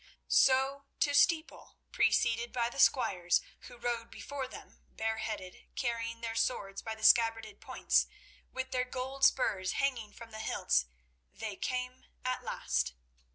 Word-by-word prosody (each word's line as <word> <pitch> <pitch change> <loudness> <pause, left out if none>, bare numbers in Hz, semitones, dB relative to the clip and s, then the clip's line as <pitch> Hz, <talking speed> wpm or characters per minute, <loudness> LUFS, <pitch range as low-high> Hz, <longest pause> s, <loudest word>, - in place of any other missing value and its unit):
So 270 +1 +3
to 285 - +3
Steeple, 320 +2 +2
preceded 235 0 +2
by 240 -2 0
the - - -8
squires, 185 -9 +4 0.3
who 245 - -12
rode 235 -1 -2
before 275 -2 -5
them - - -12
bareheaded, 220 -4 -4
carrying 230 -1 -2
their 230 -1 -3
swords 200 -4 -1
by 225 -1 -5
the 220 - -13
scabbarded 225 -2 +4
points, - - +1 0.4
with 260 0 -4
their 250 0 +1
gold 260 +2 -5
spurs 190 -9 +2
hanging 250 -7 -1
from 230 +1 -12
the 220 - -8
hilts, 60 - +1 0.4
they 215 -1 -5
came 250 +3 -4 0.2
at 255 0 -1
last. - - -1
235 Hz, 140 wpm, -32 LUFS, 220-260 Hz, 0.4 s, squires